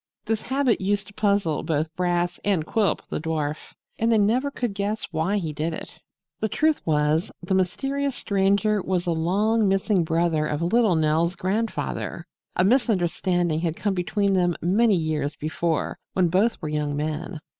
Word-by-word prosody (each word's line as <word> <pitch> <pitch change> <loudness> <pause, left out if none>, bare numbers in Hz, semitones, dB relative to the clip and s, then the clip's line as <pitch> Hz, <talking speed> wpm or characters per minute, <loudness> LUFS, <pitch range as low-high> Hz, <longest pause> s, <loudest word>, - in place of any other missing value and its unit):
This 220 0 -1
habit 265 -3 +1
used 200 +1 0
to - - -16
puzzle 200 -7 +1
both 155 +1 -2
Brass 175 0 0
and 190 -6 +1
Quilp, 205 -1 0
the - - -1
dwarf, 155 -1 -3 0.2
and 230 +1 +2
they 225 - +4
never 235 +7 +2
could 245 -6 -3
guess 205 +2 -2
why 170 +5 0
he 165 -6 -3
did 160 +3 -2
it. - - -10 0.4
The 220 - -1
truth 310 +7 +1
was, 150 +2 +1
the 185 - -1
mysterious 270 +9 0
Stranger 200 +1 +1
was 180 -1 -1
a 175 - 0
long 205 +7 +2
missing 195 -1 +2
brother 165 -1 +1
of 150 +2 -2
little 215 +1 +3
Nell's 160 +3 +2
grandfather. 210 +5 -2 0.3
A - - +3
misunderstanding 180 - +1
had 165 -1 -1
come 205 +1 -1
between 195 +2 0
them 175 -2 +2
many 205 +5 +3
years 155 -3 -1
before 160 +1 -2
when 180 -2 +2
both 200 +7 +2
were 155 - -2
young 150 -1 -1
men. 155 +3 -3
180 Hz, 165 wpm, -24 LUFS, 160-210 Hz, 0.4 s, they